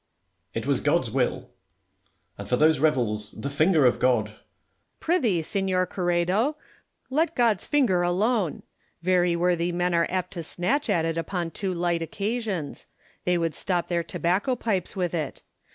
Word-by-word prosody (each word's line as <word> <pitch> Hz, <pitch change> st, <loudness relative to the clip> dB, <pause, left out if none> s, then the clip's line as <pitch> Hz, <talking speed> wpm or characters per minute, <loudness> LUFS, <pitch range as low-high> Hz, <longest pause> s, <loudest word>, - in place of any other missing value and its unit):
] -, -, -49 dB
Merino. -, -, -2 dB
It -, -, -7 dB
was -, -, +2 dB
God's -, -, +1 dB
will. -, -, -1 dB, 0.9 s
As -, -, -7 dB
for 125 Hz, -, +2 dB
those 155 Hz, +2 st, +4 dB
rebels, 120 Hz, -8 st, +1 dB
the 140 Hz, -, -4 dB
finger 155 Hz, 0 st, +3 dB
of 125 Hz, -, +3 dB
God 120 Hz, -4 st, +2 dB
Lacy. 105 Hz, -, -17 dB, 0.6 s
Pry 350 Hz, +3 st, +1 dB
thee, 205 Hz, -, +1 dB
Seuor 190 Hz, 0 st, 0 dB
Ouredo, 180 Hz, -, +1 dB, 0.6 s
let 320 Hz, +4 st, +1 dB
God's 230 Hz, -6 st, +2 dB
finger 240 Hz, -12 st, +3 dB
alone. 190 Hz, +1 st, 0 dB, 0.4 s
Very 180 Hz, -1 st, +3 dB
worthy 175 Hz, 0 st, +1 dB
men 175 Hz, 0 st, 0 dB
are 170 Hz, 0 st, +3 dB
apt 185 Hz, 0 st, -2 dB
to 175 Hz, -4 st, -5 dB
snatch 200 Hz, -, -1 dB
at 170 Hz, -5 st, +2 dB
it 165 Hz, 0 st, -1 dB
upon 170 Hz, -1 st, -3 dB
too 195 Hz, +1 st, -3 dB
light 175 Hz, -1 st, 0 dB
occasions: 200 Hz, -3 st, -3 dB, 0.4 s
they 180 Hz, 0 st, +2 dB
would 165 Hz, -2 st, -1 dB
stop 175 Hz, +3 st, -1 dB
their 170 Hz, -1 st, +1 dB
tobacco 185 Hz, +9 st, 0 dB
pipes 205 Hz, -7 st, -2 dB
with 180 Hz, -3 st, -1 dB
it. 155 Hz, -5 st, -3 dB
175 Hz, 170 wpm, -26 LUFS, 165-200 Hz, 0.9 s, those